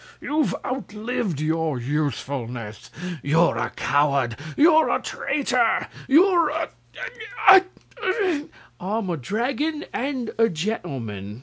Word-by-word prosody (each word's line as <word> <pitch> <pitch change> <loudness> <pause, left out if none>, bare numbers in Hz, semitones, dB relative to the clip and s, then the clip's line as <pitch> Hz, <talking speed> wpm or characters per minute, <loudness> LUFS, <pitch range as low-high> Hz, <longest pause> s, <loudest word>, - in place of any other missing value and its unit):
"You've 300 0 0
outlived 220 - -3
your 160 -3 0
usefulness! 125 -5 -3 0.3
You're 160 +4 +3
a - - -1
coward! 140 -5 +1 0.2
You're 315 +1 +6
a - - +2
traitor! 280 +1 0 0.2
You're 340 +2 +5
a 320 +2 -2 0.8
a 385 0 +11 0.7
a 300 -4 -1 0.2
" - - -27
"I'm 195 +1 -2
a 170 - -1
dragon 270 - -2
and 260 -3 -2
a 225 0 +5
gentleman!" 130 - -4
200 Hz, 110 wpm, -24 LUFS, -, 0.8 s, a